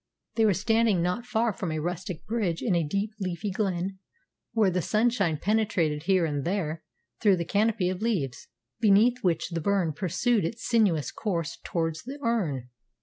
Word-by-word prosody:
They 225 - +3
were 205 -4 +4
standing 220 -2 +2
not 180 +8 -1
far 230 -2 +1
from 180 -2 -4
a 155 - -2
rustic 175 +1 -4
bridge 210 -7 -1
in 215 - +1
a 170 - +3
deep, 200 +7 -1
leafy 185 +1 -3
glen, 190 -1 -2 0.5
where 215 -4 +3
the 180 0 0
sunshine 210 -4 +1
penetrated 175 -6 0
here 190 -2 +3
and 145 -3 -2
there 170 -3 -2 0.4
through 205 -4 +5
the 170 -1 -3
canopy 210 -1 +1
of 185 +1 -2
leaves, 185 - -1 0.3
beneath 225 +3 +4
which 170 -3 +1
the 165 -2 -3
burn 185 -3 +1
pursued 195 - +1
its 225 +7 -4
sinuous 195 - +2
course 170 -6 -3
towards 165 -2 -2
the 270 +4 -7
Earn. 160 - -1
190 Hz, 170 wpm, -27 LUFS, 165-220 Hz, 0.5 s, through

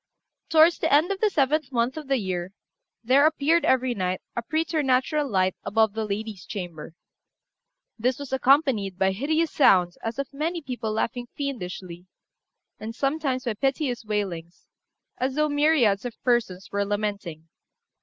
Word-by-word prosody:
Towards 325 +1 +5
the - - 0
end 305 +6 +4
of 390 - -2
the 430 - +4
seventh 305 -3 +1
month 240 +1 0
of 310 -3 -7
the 270 -1 +2
year, 185 -3 -3 0.5
there 270 +5 +5
appeared, 315 +2 +2
every 260 -1 +2
night, 185 -3 -2 0.2
a 235 - -1
preternatural 300 0 0
light 185 -3 +1
above 220 -1 +2
the 220 0 -2
lady's 210 -1 -5
chamber; 170 -5 -7 1.0
this 250 +3 +1
was 285 -2 -7
accompanied 265 - +2
by 190 0 +2
hideous 310 +10 0
sounds 180 -10 +4
as 225 +2 -4
of 275 0 -4
many 325 +5 -2
people 250 -7 -4
laughing 235 +3 -2
fiendishly, 185 -10 -6 0.7
and 225 +1 -6
sometimes 275 -1 -1
by 235 - -1
piteous 270 +1 -1
wailings, 190 -6 -4 0.5
as 260 +1 -1
though 305 0 +2
myriads 290 -9 +3
of 245 -2 -7
persons 225 -7 0
were 200 0 0
lamenting. 200 -6 -4
245 Hz, 150 wpm, -25 LUFS, 200-285 Hz, 1.0 s, Towards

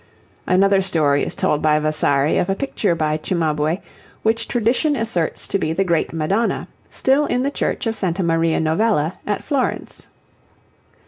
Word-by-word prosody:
Another 195 +1 +4
story 155 -7 +1
is - - -4
told 150 - 0
by 155 -1 +3
Vasari 150 -1 +1
of 180 - -2
a 195 - +1
picture 205 -7 -1
by 155 -1 0
Cimabue, 155 -1 0 0.5
which 225 +1 +1
tradition 245 +6 +1
asserts 180 - -2
to 195 - -1
be 155 -2 -1
the 195 - +1
great 170 -4 0
Madonna, 190 +8 -1 0.2
still 275 +3 +1
in 250 +1 0
the 280 - 0
Church - - -2
of 225 0 -1
Santa 185 -2 -1
Maria 165 -1 +1
Novella 160 0 +1
at 205 - -1
Florence. 280 -4 -3
180 Hz, 155 wpm, -20 LUFS, 155-225 Hz, 0.5 s, Another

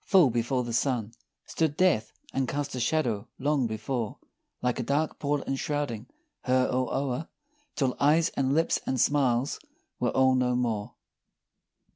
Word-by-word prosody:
Full 180 - +5
before 120 +2 0
the 120 -1 -5
sun 120 -3 0 0.3
Stood 155 -3 -1
Death 145 -13 +3 0.2
and 135 -1 0
cast 145 +2 -3
a 130 - -3
shadow 120 -6 0
long 140 -2 +1
before, 110 +1 -3 0.4
Like 125 -1 -1
a - - 0
dark 145 +5 0
pall 145 -1 0
enshrouding 135 -4 -2 0.4
her 130 0 +3
all 130 0 0
o'er, 135 +3 -2 0.5
Till 130 -3 0
eyes, 155 +3 +4
and 135 0 0
lips, 165 +1 +2
and 130 - 0
smiles, 135 -2 +2 0.4
were - - +1
all 130 0 +4
no 125 -1 +2
more! 115 -4 -1
130 Hz, 150 wpm, -28 LUFS, 120-145 Hz, 0.5 s, Full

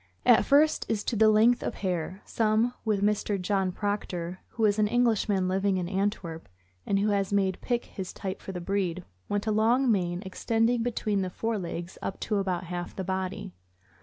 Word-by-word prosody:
At 240 - +6
first, 300 +2 +4
j;s 210 -2 0
to 235 - -1
the 220 0 +5
length 225 +3 +4
of - - -3
hair, 185 0 -3
some, 225 +2 +1
with 210 -3 0
Mr. 205 -1 +1
John 190 0 0
Proctor, 185 -3 -3
who 225 - -1
is 205 0 +2
an 210 - +4
Englishman 220 -5 +2
living 190 +1 +1
in 180 -1 -2
Antwerp, 190 -4 -2 0.4
and 195 - +2
who 205 +2 +2
has 200 -1 0
made 195 -2 +1
Pick 240 -1 -1
his 190 -2 -6
type 190 -1 -5
for - - -6
the 180 - -5
breed, 185 -1 -1 0.3
want 205 0 -1
a 220 - +1
long 235 +4 +3
mane 180 -2 0
extending 225 +5 +1
between 215 -4 0
the 185 - -2
fore 225 +4 -2
legs 175 0 -6
up 195 - -4
to 210 - 0
about 185 -3 -1
half 175 0 -5
the 190 - -3
body. 190 - -3
200 Hz, 190 wpm, -28 LUFS, 185-220 Hz, 0.4 s, At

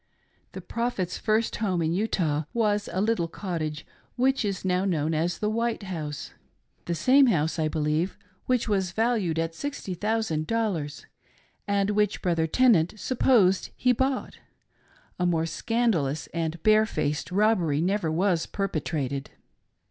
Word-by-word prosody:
'The - - -6
Prophet's 230 -7 -2
first 220 +1 +1
home 190 -5 0
in 165 0 0
Utah 170 -7 0
was 210 -3 +1
a 180 - -2
little 205 -4 +1
cottage 160 -4 -4 0.3
which 260 +1 +2
is 195 -2 -3
now 180 0 +1
known 160 -5 0
as 165 +3 0
the 210 - -1
White 230 0 -1
House. 155 -6 -5 0.3
— - - -43
The 170 - 0
same 260 - +5
house, 160 -6 +1
I 155 - +2
believe, 155 +3 -1 0.3
which 250 -2 +1
was 190 -4 0
valued 220 -7 +1
at 165 0 -1
sixty 280 -2 -5
thousand 205 -5 -1
dollars, 185 -11 -2 0.6
and 200 0 +1
which 210 -1 0
Brother 165 -3 +1
Tenant 210 -4 +3
supposed 225 -7 +3
he 250 - +3
bought: 260 +2 -1 0.4
— - - -33
a 180 - +2
more 165 -2 +1
scandalous 165 - 0
and 165 -1 -3
barefaced 215 -9 +2
robbery 185 -7 +2
never 180 -1 0
was 175 0 +1
perpetrated. 150 -8 -3
185 Hz, 145 wpm, -26 LUFS, 160-220 Hz, 0.6 s, same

